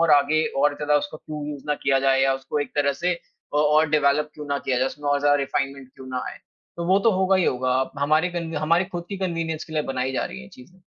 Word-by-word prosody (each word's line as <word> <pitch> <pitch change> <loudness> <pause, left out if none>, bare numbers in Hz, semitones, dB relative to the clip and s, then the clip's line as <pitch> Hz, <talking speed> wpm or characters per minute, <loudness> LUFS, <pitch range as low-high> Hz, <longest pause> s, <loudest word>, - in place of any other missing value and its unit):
और 165 -2 +3
आगे 150 +2 +4 0.2
और 145 0 +3
ज़्यादा 150 0 +2
उसको 145 +2 -6
क्यों 150 -1 -7
यूज़ 145 -2 -7
ना 150 - +1
किया 135 -1 +3
जाए 135 0 +3
या 135 0 +3
उसको 135 +2 -3
एक 145 - -3
तरह 140 -1 +3
से 180 0 +3
अ 155 -3 -11
और 150 +1 +4
डेवलप 150 0 +2
क्यों 150 -1 -8
ना 140 0 -1
किया 130 - -1
जाए, 130 - +2
उसमें 145 +1 -5
और 145 - +3
ज़्यादा 145 0 +4
रिफ़ाइनमेंट 135 -1 -3
क्यों 130 - -12
ना 130 -1 -3
आए, - - -8 0.4
तो 170 - -3
वो 190 +2 +4
तो 225 +3 +4
होगा 190 0 +3
ही 185 - +2
होगा। 130 0 0
अब 130 - -2
हमारे 155 +5 +2
कन 170 -2 -4
हमारे 165 +4 +2
खुद 175 -1 -4
की 200 - -4
कन्वीनियंस 165 -4 -2
के 160 - -12
लिए 155 -1 0
बनाई 130 +1 -1
जा - - -1
रही - - -7
हैं 65 - -9
ये - - -14
चीज़ें। 180 +9 -16
150 Hz, 275 wpm, -24 LUFS, 135-165 Hz, 0.4 s, आगे